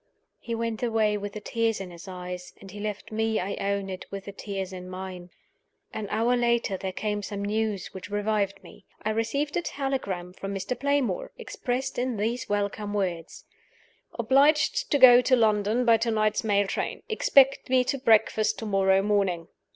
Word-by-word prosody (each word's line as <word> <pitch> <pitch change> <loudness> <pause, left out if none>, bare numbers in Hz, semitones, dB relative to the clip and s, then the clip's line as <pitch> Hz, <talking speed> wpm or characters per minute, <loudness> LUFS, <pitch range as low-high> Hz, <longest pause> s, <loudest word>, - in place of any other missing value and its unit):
He 235 -1 -4
went 230 -1 -3
away 220 -3 +2
with 205 0 -5
the 215 - -5
tears 225 0 -1
in 190 -2 -7
his 175 +3 -11
eyes; 180 -1 -7
and 195 - -12
he 205 - -9
left 210 0 -5
me, 220 0 0
I 195 +2 -3
own 200 0 -1
it, 185 -1 -7
with 195 0 -7
the 200 - -6
tears 195 -1 -5
in 180 0 -8
mine. 185 -1 -7 0.6
An 215 -2 -4
hour 230 +3 +2
later 235 -4 +1
there 190 0 -4
came 210 +2 -2
some 200 0 -4
news 210 -2 -2
which 190 +1 -8
revived 205 -1 -1
me. - - -15 0.2
I 215 - 0
received 255 +7 -1
a - - +1
telegram 260 - -3
from 195 +1 -5
Mr. 195 +6 -2
Playmore, 275 -8 0
expressed 265 - -3
in 250 -2 -1
these 230 +4 -2
welcome 205 0 -2
words: 175 -5 -3 0.7
"Obliged 295 - +3
to 285 - +3
go 250 -2 +9
to 255 +1 +4
London 220 +1 +2
by 230 -1 +6
to 230 +1 -1
night's 215 -1 +1
mail 205 -2 +2
train. - - -3
Expect 275 - +4
me 255 0 +4
to 275 +2 -2
breakfast 220 -3 +3
to 225 - -5
morrow 195 -1 +3
morning." 195 -5 0
210 Hz, 180 wpm, -27 LUFS, 195-235 Hz, 0.7 s, go